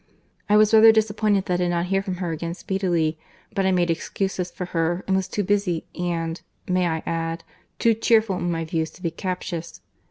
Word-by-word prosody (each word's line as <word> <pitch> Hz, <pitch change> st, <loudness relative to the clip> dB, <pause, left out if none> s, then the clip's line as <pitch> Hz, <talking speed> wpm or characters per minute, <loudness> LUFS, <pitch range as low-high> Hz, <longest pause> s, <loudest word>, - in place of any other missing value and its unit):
—I 210 Hz, -, +6 dB
was 215 Hz, +1 st, +4 dB
rather 220 Hz, 0 st, +9 dB
disappointed 215 Hz, -2 st, +1 dB
that 180 Hz, -, -1 dB
I -, -, +2 dB
did -, -, 0 dB
not 170 Hz, 0 st, 0 dB
hear 195 Hz, +1 st, +1 dB
from 190 Hz, -2 st, -4 dB
her 175 Hz, -2 st, -3 dB
again 165 Hz, +1 st, -4 dB
speedily; 175 Hz, -5 st, -1 dB, 0.3 s
but 195 Hz, -1 st, +1 dB
I -, -, +3 dB
made 175 Hz, -2 st, +2 dB
excuses 185 Hz, +2 st, -2 dB
for 180 Hz, -, -6 dB
her, 175 Hz, +2 st, 0 dB
and 190 Hz, -, +1 dB
was 190 Hz, -1 st, 0 dB
too 205 Hz, -, -2 dB
busy, 200 Hz, -4 st, 0 dB
and—may 175 Hz, +1 st, -2 dB
I 160 Hz, -1 st, -2 dB
add?—too 165 Hz, +7 st, -2 dB
cheerful 220 Hz, -3 st, +2 dB
in 175 Hz, -, -2 dB
my 165 Hz, -1 st, -1 dB
views 160 Hz, 0 st, -1 dB
to 180 Hz, -, -16 dB
be 170 Hz, -, 0 dB
captious. 175 Hz, -2 st, -5 dB
180 Hz, 195 wpm, -24 LUFS, 165-195 Hz, 0.3 s, rather